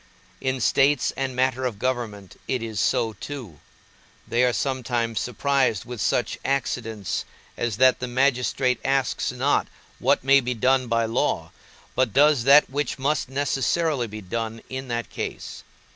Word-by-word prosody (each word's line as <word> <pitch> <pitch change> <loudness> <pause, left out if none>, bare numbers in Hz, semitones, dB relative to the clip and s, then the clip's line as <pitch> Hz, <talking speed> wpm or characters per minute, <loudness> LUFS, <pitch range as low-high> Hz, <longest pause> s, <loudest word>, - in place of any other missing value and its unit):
In 130 -1 -1
states 140 +3 +3
and 135 -1 -3
matter 130 0 +1
of 120 -5 -2
government 115 -5 -3
it 125 -3 -1
is 110 -3 -4
so 115 -1 +1
too; 115 - -8 0.7
they 120 +2 +2
are 125 - +4
sometimes 120 -3 -1
surprised 130 -3 0
with 120 -3 -6
such - - 0
accidents, 115 -7 -2 0.3
as 115 -4 -2
that 130 +1 +5
the 125 - -3
magistrate 125 0 +1
asks 135 -2 0
not 130 +3 +1 0.3
what - - +2
may 135 +1 +6
be 125 -1 -2
done 130 +2 +2
by 115 0 +1
law, 115 - -1 0.4
but 130 -4 +1
does 145 -3 +4
that 140 +2 +7
which 145 +3 -2
must 140 0 0
necessarily 140 0 0
be 110 0 -8
done 115 +3 -4
in 130 0 -5
that 120 -1 -3
case. - - -6
125 Hz, 150 wpm, -24 LUFS, 115-135 Hz, 0.7 s, that